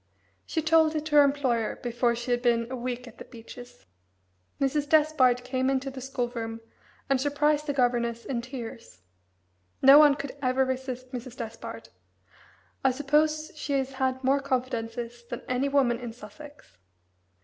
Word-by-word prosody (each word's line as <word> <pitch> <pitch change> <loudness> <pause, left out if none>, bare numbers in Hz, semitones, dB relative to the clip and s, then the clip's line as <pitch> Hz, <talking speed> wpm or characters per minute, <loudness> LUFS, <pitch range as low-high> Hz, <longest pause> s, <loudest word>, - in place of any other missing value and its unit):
She 320 - -1
told 320 0 +4
it 305 0 -2
to 305 -1 -1
her 290 - +9
employer 265 -6 0
before 240 0 0
she 240 +1 -4
had 240 0 +1
been 235 -1 +1
a - - -2
week 250 0 -4
at 235 - -14
the - - -7
Beeches. 235 - -12 0.7
Mrs. 285 +1 0
Despard 285 -5 +4
came 255 +1 -1
into 270 0 -1
the 265 0 -8
school 250 -2 -2
room 225 -2 -5 0.5
and 270 -1 +1
surprised 295 +1 +1
the 285 - 0
governess 240 -3 0
in 245 -3 -2
tears. 230 - -9 0.8
No 275 +2 +9
one 295 -2 +7
could 280 -1 -6
ever 260 0 +2
resist 255 -1 -4
Mrs. 250 -1 -7
Despard 165 - -7 0.9
I 265 - +5
suppose 305 +3 +1
she 290 -1 -4
has 270 -1 0
had 260 -1 -1
more 270 +2 +3
confidences 240 -3 -3
than - - -6
any 255 +2 0
woman 260 -4 +2
in 240 -2 -6
Sussex. 245 - -14
255 Hz, 160 wpm, -27 LUFS, 240-280 Hz, 0.9 s, her